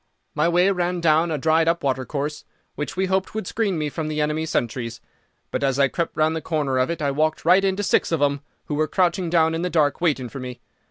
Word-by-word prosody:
"My 155 +3 +2
way 180 +3 +3
ran 180 -1 -1
down 165 0 +3
a 155 - -1
dried 160 +3 +2
up 170 +1 +1
watercourse, 140 +2 -2 0.3
which 150 +6 -5
we 190 - +2
hoped 190 +2 -1
would 220 - -3
screen 200 -3 -1
me 150 -1 -1
from 155 +2 -4
the 155 0 -3
enemy's 150 +1 -1
sentries; 115 -4 -2 0.5
but - - -2
as 135 -1 +1
I 140 -1 +4
crept 170 +3 -3
round 155 +1 +2
the 160 - -3
corner 145 -6 -1
of 130 - +1
it 170 -2 -3
I 140 - +1
walked 155 +2 0
right 185 +3 +5
into 195 +1 0
six - - +2
of 165 - +1
them, 140 -1 +1 0.2
who - - -4
were 155 +1 +1
crouching 180 0 +1
down 165 -1 +3
in 165 - -2
the 180 - -1
dark 150 -3 +1
waiting 145 -7 +1
for 135 - -8
me. 125 -1 -7
155 Hz, 240 wpm, -23 LUFS, 145-175 Hz, 0.5 s, right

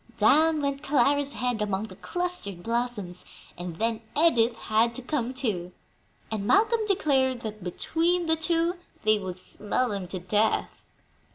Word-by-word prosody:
Down 300 +8 +4
went 280 0 -1
Clara's 285 0 +2
head 245 -1 -1
among 205 -1 -1
the 210 -4 -8
clustered 355 - -3
blossoms, 230 -6 -2 0.3
and 175 -1 -6
then 225 +1 0 0.2
Edith 240 -8 +4
had 225 +2 +1
to 260 - -4
come 255 -3 -1
too; 205 -10 -2 0.6
and 205 -2 -2
Malcolm 440 +2 +4
declared 265 - +2
that 215 -3 -6
between 335 - 0
the 320 0 +3
two 335 +2 +1 0.3
they 215 -1 +4
would 185 -2 -5
smell 210 +6 -1
them 200 -4 -4
to 185 - -4
death. 205 +5 0
235 Hz, 150 wpm, -27 LUFS, 205-300 Hz, 0.6 s, Down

